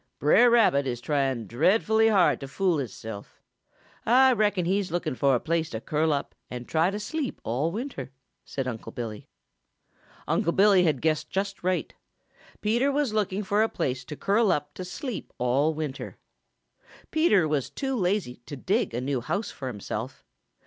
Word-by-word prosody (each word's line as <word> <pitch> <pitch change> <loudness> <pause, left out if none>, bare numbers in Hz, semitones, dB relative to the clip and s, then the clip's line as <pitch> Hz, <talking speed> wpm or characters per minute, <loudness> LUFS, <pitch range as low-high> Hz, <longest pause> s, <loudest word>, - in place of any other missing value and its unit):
"Brer 235 +12 +5
Rabbit 200 - +4
is 120 -2 -2
trying 135 -3 -1
dreadful 195 - +2
hard 195 -5 +4
to 135 - -7
fool 175 +2 0
hisself. 110 -5 -7 0.6
Ah 260 +3 +5
reckon 205 -4 +1
he's 190 0 0
looking 170 -3 -1
fo' 135 +1 +2
a 125 - +3
place 165 +2 -1
to 110 - -4
curl 155 +6 0
up 140 -1 -2 0.2
and 125 -1 -7
try 165 +2 +2
to 205 +2 -4
sleep 275 +6 -4
all 135 +8 -1
winter," 210 - -5 0.3
said 135 -2 -4
Unc' 115 -2 -6
Billy. 110 -3 -6 1.0
Unc' 170 - +1
Billy 195 -2 +5
had 150 -6 0
guessed 155 -1 0
just 195 +1 -3
right. 185 0 -1 0.7
Peter 240 +6 +2
was 280 -5 0
looking 210 -1 0
for 205 +2 +1
a 225 - +2
place 130 0 -2
to 150 - -7
curl 205 +5 +2
up 145 0 -2
to 185 - -6
sleep 225 +6 -6
all 135 +6 +1
winter. 150 -3 -5 0.9
Peter 210 - +3
was 150 -4 -1
too 270 -1 -3
lazy 185 - -1
to 145 - -6
dig 190 - -1
a 120 - -1
new 130 -1 -1
house 195 - -2
for 135 - -7
himself. 110 +2 -6
160 Hz, 170 wpm, -26 LUFS, 135-205 Hz, 1.0 s, Brer